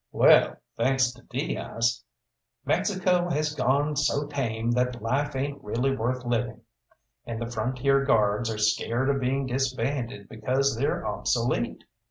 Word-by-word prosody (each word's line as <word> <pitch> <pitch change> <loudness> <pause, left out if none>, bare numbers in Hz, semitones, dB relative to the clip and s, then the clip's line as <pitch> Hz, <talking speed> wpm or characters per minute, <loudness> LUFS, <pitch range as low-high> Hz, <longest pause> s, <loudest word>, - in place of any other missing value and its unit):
Well, - - +5 0.2
thanks 130 +1 +2
to 125 - -16
Diaz, 115 +1 -2 0.6
Mexico 180 -3 +1
has 150 -1 0
gone 145 +1 +1
so 145 0 +1
tame 120 -5 -2
that 125 0 0
life 135 +6 -1
ain't 140 +1 -3
really 125 +6 0
worth 125 +1 -2
living, 120 -1 -1 0.6
and 115 -1 -5
the 115 - -2
Frontier 130 +4 +1
Guards 110 -3 +2
are 110 - -3
scared 115 +5 +1
of 135 -1 -1
being 135 +2 0
disbanded 130 -3 -2
because 130 +4 0
they're 135 +5 -1
obsolete. - - -1
130 Hz, 135 wpm, -26 LUFS, 115-140 Hz, 0.6 s, Well